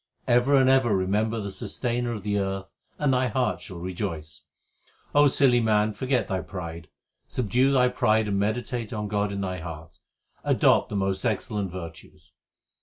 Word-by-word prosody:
Ever 125 +4 +4
and 130 -1 +5
ever 130 -6 +4
remember 105 +4 0
the 100 -2 -4
Sustainer 120 +3 -2
of 105 - -6
the 105 -1 0
earth, 95 0 -3 0.2
and 145 -3 +2
thy 125 0 +2
heart 125 +2 -1
shall 95 -5 -8
rejoice. 85 -3 -5 0.8
silly 130 -3 +4
man, 110 -1 +2
forget 130 +4 0
thy 95 -3 -1
pride, 85 -4 -7 0.4
Subdue 125 +3 +1
thy 125 -2 +4
pride 110 -3 +2
and 100 -1 0
meditate 115 +2 -2
on 105 -2 -3
God 105 0 -1
in 100 0 -3
thy 90 -1 -3
heart; 80 -1 -9 0.4
adopt - - +3
the 105 - -4
most 95 -1 -1
excellent 105 -1 -1
virtues. 85 -3 -10
105 Hz, 160 wpm, -26 LUFS, 95-120 Hz, 0.8 s, and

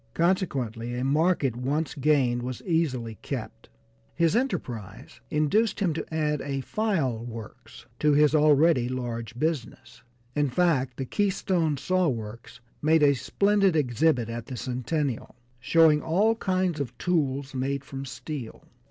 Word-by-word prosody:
Consequently 130 - 0
a 125 - -2
market 145 -2 +2
once 140 +5 -1
gained 135 -5 +2
was 125 0 -5
easily 130 - -1
kept. - - -6 0.5
His 170 +2 +2
enterprise 120 - -3
induced 200 +11 +1
him 185 -6 +1
to 160 - -5
add 150 -2 0
a 135 -1 -3
file 150 - -1
works 115 -3 -10
to 150 -1 +3
his 150 +1 +4
already 150 -4 +4
large 120 -2 -4
business; 155 -2 -3 0.3
in 145 -1 +2
fact, 135 -5 +1
the 135 - -3
Keystone 180 - 0
Saw 185 +6 +1
Works 115 -2 -5 0.2
made 155 +1 +4
a 140 -1 +6
splendid 200 +6 +2
exhibit 130 -2 +2
at 115 0 -6
the 130 -3 -6
Centennial, 130 +1 -3 0.2
showing 155 +4 +4
all 200 +8 +2
kinds 185 -6 0
of 140 -4 -4
tools 140 -6 -1
made 135 +1 -2
from 135 0 -6
steel. 135 -2 -7
145 Hz, 135 wpm, -26 LUFS, 125-165 Hz, 0.5 s, a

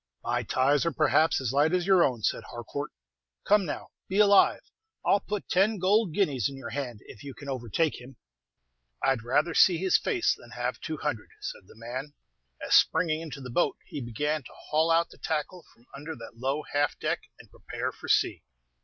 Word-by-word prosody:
"My - - 0
ties, 140 +3 +2
are, - - +2
perhaps, 160 0 +3
as 130 -2 -2
light 150 +5 +3
as 180 -1 0
your 190 -3 +5
own," 120 -4 0
said - - 0
Harcourt. 120 +5 -6 0.6
"Come, 205 -3 +4
now, - - -5 0.2
be 190 - -2
alive. 205 -1 +5 0.4
I'll 200 - +4
put 205 0 -5
ten 205 +4 +2
gold 195 +1 +2
guineas 145 - +1
in 135 - -9
your 135 - -7
hand 125 -6 -4
if - - -12
you 140 -2 -8
can 140 - -11
overtake 130 - -1
him." 130 +2 -12 0.9
"I'd 135 -3 +2
rather 145 +8 +1
see 180 0 +6
his 190 +2 +3
face 365 -7 +1
than 120 - -16
have 125 +1 -2
two 155 - -4
hundred," 145 -8 -3
said 95 - -7
the - - -16
man, 130 +6 -6 0.5
as, - - -1
springing 160 -3 +4
into 150 -4 -7
the 125 -2 -7
boat, 175 - +1
he 145 - -6
began 150 +6 -2
to 125 - -14 0.2
haul 160 +2 +3
out 165 +1 +3
the - - -16
tackle 160 +3 -3
from 120 - -25
under 150 +3 -7
the 115 - -10
low 135 +6 -2
half 145 0 +1
deck, - - -1 0.2
and - - -16
prepare - - -5
for - - -11
sea. - - +2
150 Hz, 200 wpm, -28 LUFS, 130-170 Hz, 0.9 s, see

